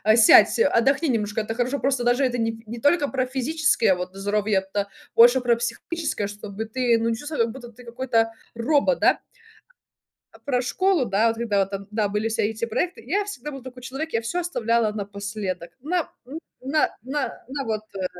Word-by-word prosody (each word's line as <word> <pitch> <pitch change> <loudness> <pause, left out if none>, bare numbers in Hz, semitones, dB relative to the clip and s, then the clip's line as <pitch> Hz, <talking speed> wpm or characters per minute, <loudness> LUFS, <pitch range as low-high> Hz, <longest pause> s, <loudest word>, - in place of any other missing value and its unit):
сядь 230 -2 +7
отдохни 280 - +3
немножко 215 -2 0
это 225 +1 -4
хорошо. 250 +4 -1
Просто 270 -3 0
даже 245 +3 +2
это 250 -2 +1
нь 225 0 -2
не 230 +2 -7
только 290 +2 +3
про 260 -1 0
физическое, 265 -4 +2
вот, 180 +1 -6
здоровье, 205 0 0
это 200 +1 -2 0.3
больше 240 +3 +7
про 240 -1 +3
психическое, 240 +2 -3
чтобы 205 +1 -6
ты 235 +1 +1
ну 230 0 0
чувствова 295 +2 -3
как 225 - -2
будто 240 -1 -10
ты 245 +2 -15
какой-то 235 -1 0 0.3
робот, 290 - +2
да. - - +4 1.3
Про 255 -3 +1
школу, 370 +2 +1
да, 210 +3 +2
вот, 225 0 0
когда 220 -4 0
вот 195 0 +1
там 195 0 -6
да, 210 -2 0
были 210 +2 -1
все 225 -1 0
эти 220 +1 -3
проекты, 340 +11 -2
я 400 +9 0
всегда 295 -8 -6
был 270 -3 -9
такой 255 -1 -10
человек, 275 +6 -5
я 230 - +1
всё 230 +11 -2
оставляла 230 -9 +1
напоследок. 200 -3 -5
На, 335 +2 -1
м, 285 +6 -7 0.2
на 285 +4 +1
на 275 +2 -3
на 275 +1 -4
вот, 215 -3 -2
э, 190 -1 -2
235 Hz, 190 wpm, -24 LUFS, 215-275 Hz, 1.3 s, сядь